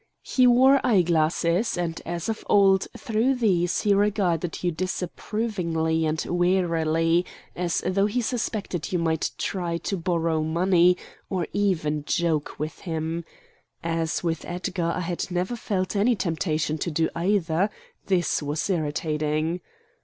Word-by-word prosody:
He 255 Hz, -1 st, +3 dB
wore 260 Hz, +3 st, +6 dB
eye 205 Hz, -7 st, +4 dB
glasses, 170 Hz, +4 st, +1 dB
and 170 Hz, -2 st, -2 dB
as 170 Hz, 0 st, -3 dB
of 220 Hz, -1 st, -3 dB
old 195 Hz, -1 st, +5 dB
through 245 Hz, +1 st, +1 dB
these 185 Hz, -8 st, +1 dB
he 205 Hz, -, +3 dB
regarded 190 Hz, -5 st, 0 dB
you 175 Hz, -, +2 dB
disapprovingly 170 Hz, -2 st, -1 dB
and 155 Hz, +1 st, -1 dB
warily 170 Hz, -2 st, +2 dB, 0.3 s
as 175 Hz, -1 st, -1 dB
though 195 Hz, +2 st, +2 dB
he 215 Hz, +4 st, -1 dB
suspected 220 Hz, -, -2 dB
you 180 Hz, -, +1 dB
might 160 Hz, -2 st, 0 dB
try 175 Hz, -3 st, -2 dB
to 195 Hz, +3 st, -3 dB
borrow 165 Hz, -2 st, 0 dB
money, 175 Hz, +2 st, +3 dB, 0.3 s
or 180 Hz, -3 st, -1 dB
even 160 Hz, -7 st, 0 dB
joke 160 Hz, -1 st, -1 dB
with 155 Hz, 0 st, -4 dB
him. 165 Hz, -1 st, -3 dB, 0.6 s
As 165 Hz, 0 st, -1 dB
with 165 Hz, -2 st, -1 dB
Edgar 175 Hz, -1 st, -2 dB
I -, -, -2 dB
had 175 Hz, 0 st, -3 dB
never 180 Hz, +6 st, -1 dB
felt 195 Hz, -4 st, -2 dB
any 225 Hz, +4 st, +3 dB
temptation 160 Hz, -4 st, -1 dB
to 170 Hz, -, -1 dB
do 160 Hz, 0 st, +1 dB
either, 180 Hz, +1 st, +1 dB, 0.4 s
this 180 Hz, -4 st, +1 dB
was 150 Hz, +1 st, -2 dB
irritating. 155 Hz, 0 st, -1 dB
175 Hz, 140 wpm, -25 LUFS, 160-195 Hz, 0.6 s, wore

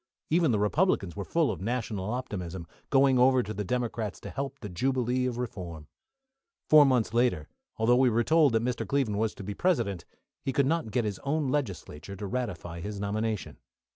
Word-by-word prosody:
Even 165 Hz, 0 st, +4 dB
the 110 Hz, -, +2 dB
Republicans 105 Hz, -, +1 dB
were 100 Hz, -, -4 dB
full 160 Hz, -, +1 dB
of 95 Hz, -, -6 dB
national 110 Hz, -3 st, -2 dB
optimism, 95 Hz, -9 st, -4 dB, 0.2 s
going 135 Hz, -2 st, +4 dB
over 130 Hz, 0 st, +5 dB
to 110 Hz, -, -5 dB
the 105 Hz, 0 st, -3 dB
Democrats 115 Hz, -2 st, -2 dB
to -, -, -8 dB
help 140 Hz, 0 st, -4 dB
the 115 Hz, -, -7 dB
jubilee 125 Hz, +5 st, 0 dB
of 120 Hz, -2 st, -3 dB
reform. 90 Hz, -10 st, -6 dB, 0.8 s
Four 155 Hz, -1 st, +8 dB
months 125 Hz, -4 st, +1 dB
later, 115 Hz, -11 st, +1 dB, 0.3 s
although 120 Hz, +2 st, +4 dB
we 130 Hz, -1 st, +5 dB
were 120 Hz, +1 st, +2 dB
told 155 Hz, -2 st, +4 dB
that 115 Hz, 0 st, +2 dB
Mr. 120 Hz, -3 st, -2 dB
Cleveland 110 Hz, -4 st, 0 dB
was 110 Hz, -1 st, 0 dB
to -, -, -8 dB
be 100 Hz, +2 st, -4 dB
President, 110 Hz, -, 0 dB, 0.4 s
he 135 Hz, -, -2 dB
could 140 Hz, +1 st, +3 dB
not 160 Hz, -4 st, 0 dB
get 115 Hz, +2 st, 0 dB
his 100 Hz, -3 st, -3 dB
own 145 Hz, 0 st, -1 dB
legislature 100 Hz, -, -3 dB
to 100 Hz, -, -6 dB
ratify 95 Hz, -7 st, -4 dB
his 100 Hz, +3 st, -5 dB
nomination. 105 Hz, +1 st, -2 dB
115 Hz, 190 wpm, -28 LUFS, 100-130 Hz, 0.8 s, Four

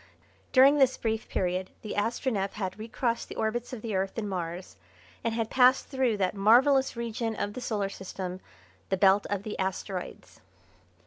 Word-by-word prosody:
During 275 Hz, +3 st, +6 dB
this 260 Hz, -1 st, +4 dB
brief 225 Hz, -1 st, -2 dB
period 185 Hz, 0 st, -1 dB
the 215 Hz, -, -5 dB
Astronef 205 Hz, -2 st, -1 dB
had 195 Hz, 0 st, -4 dB
recrossed 230 Hz, +2 st, -2 dB
the -, -, -7 dB
orbits 235 Hz, +2 st, -2 dB
of 245 Hz, -4 st, -7 dB
the 225 Hz, -2 st, -3 dB
Earth 190 Hz, +2 st, -2 dB
and 215 Hz, -2 st, -2 dB
Mars 180 Hz, -1 st, -5 dB, 0.5 s
and 230 Hz, -1 st, -1 dB
had 225 Hz, -1 st, -2 dB
passed 255 Hz, 0 st, +4 dB
through 260 Hz, -5 st, +1 dB
that 185 Hz, -2 st, 0 dB
marvellous 255 Hz, +7 st, +4 dB
region 230 Hz, -1 st, -3 dB
of 205 Hz, 0 st, -3 dB
the 255 Hz, -, -6 dB
Solar 205 Hz, -5 st, -1 dB
System, 185 Hz, -1 st, -6 dB, 0.5 s
the 190 Hz, -, +1 dB
Belt 195 Hz, +1 st, +4 dB
of 200 Hz, -1 st, -2 dB
the 215 Hz, -, -5 dB
Asteroides. 190 Hz, 0 st, -4 dB
215 Hz, 170 wpm, -28 LUFS, 190-240 Hz, 0.5 s, During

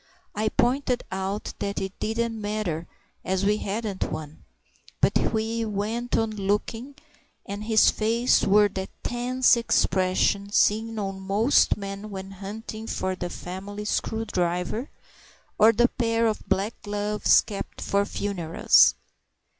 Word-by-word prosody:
I 215 Hz, +1 st, 0 dB
pointed 250 Hz, +1 st, +1 dB
out 190 Hz, +2 st, -3 dB
that 200 Hz, 0 st, -2 dB
it 190 Hz, 0 st, -4 dB
didn't 225 Hz, 0 st, -2 dB
matter 205 Hz, -6 st, -3 dB, 0.4 s
as 190 Hz, +1 st, 0 dB
we 210 Hz, +1 st, +3 dB
hadn't 205 Hz, -1 st, -3 dB
one; 155 Hz, 0 st, -7 dB, 0.6 s
but -, -, +2 dB
he 225 Hz, +1 st, 0 dB
went 220 Hz, +3 st, -2 dB
on 225 Hz, -1 st, 0 dB
looking, 215 Hz, +6 st, -2 dB, 0.5 s
and 205 Hz, +2 st, -6 dB
his 220 Hz, -1 st, +5 dB
face 230 Hz, +3 st, +2 dB
wore 205 Hz, +1 st, +5 dB
that 190 Hz, 0 st, -5 dB
tense 250 Hz, +1 st, +3 dB
expression 200 Hz, -3 st, +1 dB
seen 220 Hz, +2 st, +2 dB
on 195 Hz, -2 st, -3 dB
most 205 Hz, +8 st, +3 dB
men 200 Hz, +1 st, -6 dB
when 195 Hz, -1 st, -7 dB
hunting 215 Hz, +3 st, -7 dB
for 190 Hz, -3 st, -2 dB
the 180 Hz, -1 st, -4 dB
family 195 Hz, +4 st, -7 dB
screwdriver, 210 Hz, +1 st, -1 dB, 0.7 s
or 220 Hz, +2 st, +8 dB
the 240 Hz, +2 st, +4 dB
pair 230 Hz, -2 st, 0 dB
of 220 Hz, -2 st, -2 dB
black 200 Hz, +4 st, +1 dB
gloves 205 Hz, 0 st, +2 dB
kept 205 Hz, -3 st, -7 dB
for 200 Hz, 0 st, +1 dB
funerals. 195 Hz, -5 st, +3 dB
210 Hz, 130 wpm, -25 LUFS, 195-225 Hz, 0.7 s, or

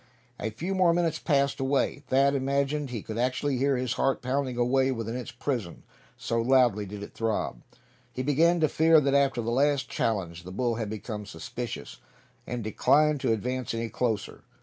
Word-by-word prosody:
A 110 Hz, -, -2 dB
few 165 Hz, -, -4 dB
more 180 Hz, -3 st, +4 dB
minutes 165 Hz, -2 st, 0 dB
passed 140 Hz, -3 st, +1 dB
away. 135 Hz, +1 st, 0 dB
Thad 135 Hz, +1 st, +3 dB
imagined 140 Hz, +1 st, 0 dB
he 115 Hz, -4 st, -5 dB
could 110 Hz, +1 st, -5 dB
actually 130 Hz, +2 st, 0 dB
hear 135 Hz, +1 st, +2 dB
his 125 Hz, -1 st, -1 dB
heart 135 Hz, -1 st, 0 dB
pounding 130 Hz, -1 st, -1 dB
away 130 Hz, +2 st, +2 dB
within 115 Hz, -2 st, -3 dB
its 125 Hz, -1 st, -5 dB
prison, 120 Hz, -7 st, -4 dB, 0.3 s
so 115 Hz, 0 st, -1 dB
loudly 120 Hz, -5 st, +3 dB
did 100 Hz, +1 st, -7 dB
it -, -, -10 dB
throb. 110 Hz, -, -2 dB, 0.5 s
He 130 Hz, -, -4 dB
began 165 Hz, +5 st, +3 dB
to 155 Hz, -, +5 dB
fear 160 Hz, +1 st, +5 dB
that 140 Hz, -2 st, +1 dB
after 140 Hz, -4 st, +2 dB
that 115 Hz, -, -2 dB
last 140 Hz, +1 st, +2 dB
challenge 90 Hz, -6 st, -2 dB
the 90 Hz, +1 st, -10 dB
bull 120 Hz, +4 st, 0 dB
had 110 Hz, -2 st, -3 dB
become 105 Hz, -1 st, -6 dB
suspicious, 115 Hz, +7 st, -6 dB, 0.5 s
and 120 Hz, -2 st, -3 dB
declined 150 Hz, +7 st, +3 dB
to 115 Hz, -, +1 dB
advance 125 Hz, +2 st, -2 dB
any 115 Hz, 0 st, -2 dB
closer. 110 Hz, -5 st, -2 dB
130 Hz, 180 wpm, -27 LUFS, 115-140 Hz, 0.5 s, to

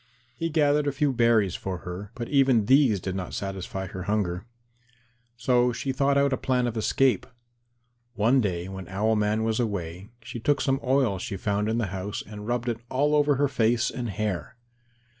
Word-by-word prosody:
He 165 Hz, +6 st, -2 dB
gathered 150 Hz, -2 st, +2 dB
a -, -, +2 dB
few 140 Hz, 0 st, 0 dB
berries 115 Hz, -6 st, +3 dB
for 95 Hz, -2 st, -4 dB
her, 90 Hz, +3 st, -6 dB
but 120 Hz, -1 st, -4 dB
even 135 Hz, -6 st, +3 dB
these 130 Hz, -5 st, +4 dB
did 95 Hz, +1 st, -4 dB
not 95 Hz, -2 st, -4 dB
satisfy 95 Hz, -1 st, -4 dB
her 95 Hz, 0 st, -7 dB
hunger. 100 Hz, -1 st, -1 dB, 0.9 s
So 125 Hz, 0 st, +3 dB
she 120 Hz, +3 st, -3 dB
thought 140 Hz, +1 st, +2 dB
out 140 Hz, -1 st, +3 dB
a -, -, +1 dB
plan 125 Hz, -1 st, 0 dB
of 120 Hz, -1 st, -2 dB
escape. 130 Hz, +3 st, +2 dB, 0.9 s
One 120 Hz, +5 st, +3 dB
day 90 Hz, -4 st, -2 dB
when 95 Hz, -2 st, -7 dB
Owl 105 Hz, +4 st, +1 dB
man 105 Hz, +1 st, +1 dB
was 110 Hz, 0 st, 0 dB
away, 95 Hz, -4 st, -3 dB
she 125 Hz, +1 st, -7 dB
took 145 Hz, +5 st, +1 dB
some 135 Hz, 0 st, +1 dB
oil 130 Hz, -7 st, +2 dB
she 100 Hz, -, -4 dB
found 105 Hz, +2 st, -1 dB
in 110 Hz, -, 0 dB
the 115 Hz, -, 0 dB
house 95 Hz, +2 st, -4 dB
and 105 Hz, 0 st, -9 dB
rubbed 120 Hz, 0 st, -1 dB
it 115 Hz, -1 st, -1 dB
all 145 Hz, +3 st, +1 dB
over 145 Hz, -1 st, +4 dB
her 145 Hz, +2 st, +2 dB
face 120 Hz, -2 st, +1 dB
and 120 Hz, -2 st, -4 dB
hair. 105 Hz, -3 st, -3 dB
115 Hz, 190 wpm, -26 LUFS, 100-130 Hz, 0.9 s, these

